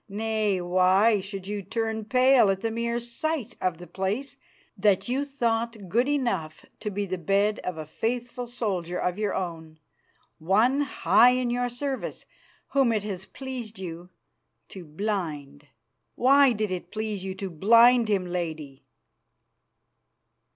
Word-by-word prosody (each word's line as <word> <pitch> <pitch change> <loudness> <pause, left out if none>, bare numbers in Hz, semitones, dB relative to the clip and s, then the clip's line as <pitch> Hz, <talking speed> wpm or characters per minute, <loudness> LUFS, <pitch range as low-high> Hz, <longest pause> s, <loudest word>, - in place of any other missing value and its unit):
Nay, 215 -1 0
why 185 +4 +3
should 195 -1 -7
you 205 +1 -4
turn 220 +2 -3
pale 255 -1 +5
at 195 0 0
the 225 - -1
mere 235 +1 -1
sight 240 +1 -3
of 180 -3 0
the 175 - -10
place 200 +10 -3 0.4
that 200 0 +2
you 260 +3 0
thought 230 -6 -2
good 240 +7 +2
enough 235 - -2
to 210 - -3
be 205 0 -2
the 185 -1 -4
bed 200 +5 +1
of 180 -3 -5
a 155 - -5
faithful 245 - -3
soldier 190 -8 -3
of 180 +2 -2
your 210 -1 -1
own, 165 -4 -5 0.6
one 220 - +3
high 255 -3 +4
in 250 -1 0
your 245 0 0
service, 265 +2 -4 0.4
whom 270 -4 +3
it 215 -3 0
has 190 -3 -5
pleased 255 -5 -7
you 175 -1 -7 0.6
to 185 -3 -10
blind? 150 -5 -4 0.5
Why 275 +1 +5
did 215 -3 -2
it 180 -1 -4
please 215 -3 -4
you 190 -1 -4
to 190 -1 -5
blind 230 +7 +5
him, 200 -3 +1
Lady?" 160 -6 -5
210 Hz, 145 wpm, -26 LUFS, 185-240 Hz, 0.6 s, pale